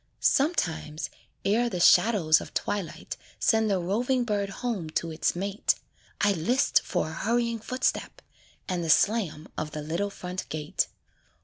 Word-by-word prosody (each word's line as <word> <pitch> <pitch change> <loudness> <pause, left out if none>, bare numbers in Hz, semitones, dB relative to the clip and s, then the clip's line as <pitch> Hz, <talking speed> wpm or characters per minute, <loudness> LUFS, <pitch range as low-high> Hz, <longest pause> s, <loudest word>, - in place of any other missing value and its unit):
Sometimes, 170 - +1 0.3
ere 230 +4 +2
the 180 - -3
shadows 175 -4 +5
of - - -10
twilight 200 -5 -3 0.2
Send 220 -1 +3
the 195 - +2
roving 240 +8 0
bird 205 -3 -1
home 200 -5 -3
to 165 +1 -2
its 155 +2 0
mate, 195 +3 0 0.4
I 205 - +4
list 200 - +2
for 155 - -1
a - - -7
hurrying 235 +5 0
footstep, 255 +4 -2 0.5
And 180 -3 -1
the 165 - -3
slam 170 -4 +2
of 155 -1 -4
the 150 - -4
little 170 +7 -1
front 180 -1 -6
gate. 150 -1 -1
195 Hz, 145 wpm, -27 LUFS, 165-230 Hz, 0.5 s, shadows